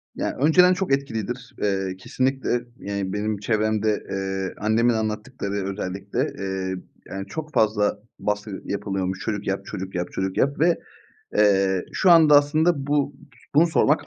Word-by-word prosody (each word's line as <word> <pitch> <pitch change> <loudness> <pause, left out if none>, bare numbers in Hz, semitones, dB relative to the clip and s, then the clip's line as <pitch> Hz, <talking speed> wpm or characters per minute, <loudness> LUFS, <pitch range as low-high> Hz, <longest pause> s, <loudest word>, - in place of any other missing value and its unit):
Ya, - - -2
önceden 180 +6 +6
çok 185 -6 0
etkilidir. 125 -2 -3
Eee, 95 -2 0
kesinlikle, 130 +3 -1 0.2
yani, 100 -1 -3
benim 105 0 -1
çevremde, 110 0 0
eee, 95 -1 -2
annemin 115 +3 +2
anlattıkları 110 0 -3 0.2
özellikle, 95 +3 -4 0.2
eee, 95 -1 -2 0.3
yani, 95 0 -5
çok 155 -1 -6
fazla 105 -1 +2 0.2
baskı 105 -1 -3
yapılıyormuş. 95 -2 -2
"Çocuk 105 0 -3
yap, 95 0 -2
çocuk 95 0 -6
yap, 90 0 -1
çocuk 95 0 -3
yap." 140 +2 +1
Ve, 170 +1 +3 0.6
eee, 95 -3 +3
şu 185 - +3
anda 155 -3 +8
aslında 150 0 +1
bu 145 -1 +1 0.4
bunu 160 +4 +6
sormak 160 -2 +2
105 Hz, 140 wpm, -24 LUFS, 95-140 Hz, 0.6 s, anda